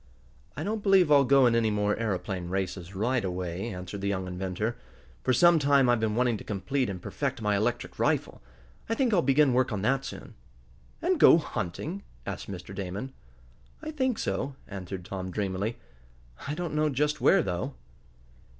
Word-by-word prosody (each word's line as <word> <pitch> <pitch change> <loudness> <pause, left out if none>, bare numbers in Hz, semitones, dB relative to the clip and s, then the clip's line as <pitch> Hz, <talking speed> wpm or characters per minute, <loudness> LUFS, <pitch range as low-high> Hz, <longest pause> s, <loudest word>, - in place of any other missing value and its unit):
"I 150 - -3
don't 215 +3 -2
believe 195 -5 +4
I'll 140 -1 +7
go 135 0 +5
in 120 - +4
any 115 -1 +2
more 105 0 +1
aeroplane 95 -4 -3
races 95 0 -3
right 120 +5 0
away," 90 +3 -3
answered 90 0 -6
the 100 - -1
young 95 -2 -1
inventor. 95 +5 -3 0.5
"For - - +2
some 170 +6 +6
time 140 -2 +4
I've 120 -1 +3
been 110 -1 0
wanting 120 -2 +2
to - - -10
complete 105 +6 -1
and 95 -2 -5
perfect 135 +7 -3
my 105 -2 +1
electric 115 +4 -2
rifle. - - 0 0.5
I 225 - +1
think 245 -2 +1
I'll 180 - +4
begin 135 0 +4
work 130 0 +2
on 105 -2 -2
that 135 +4 +2
soon." 135 - -8 0.7
"And - - +2
go - - +8
hunting?" 155 - -4 0.2
asked 100 - -5
Mr. 95 0 -7
Damon. 100 +7 -5 0.7
"I 310 - -4
think 260 -6 0
so," 130 +8 -2
answered 95 -2 -7
Tom, 95 -1 -5
dreamily. 100 +3 -2 0.7
"I 145 - -2
don't 175 -1 -4
know 150 0 +2
just 150 +2 0
where, 195 -4 +5
though." 85 -7 -3
110 Hz, 175 wpm, -28 LUFS, 95-140 Hz, 0.7 s, go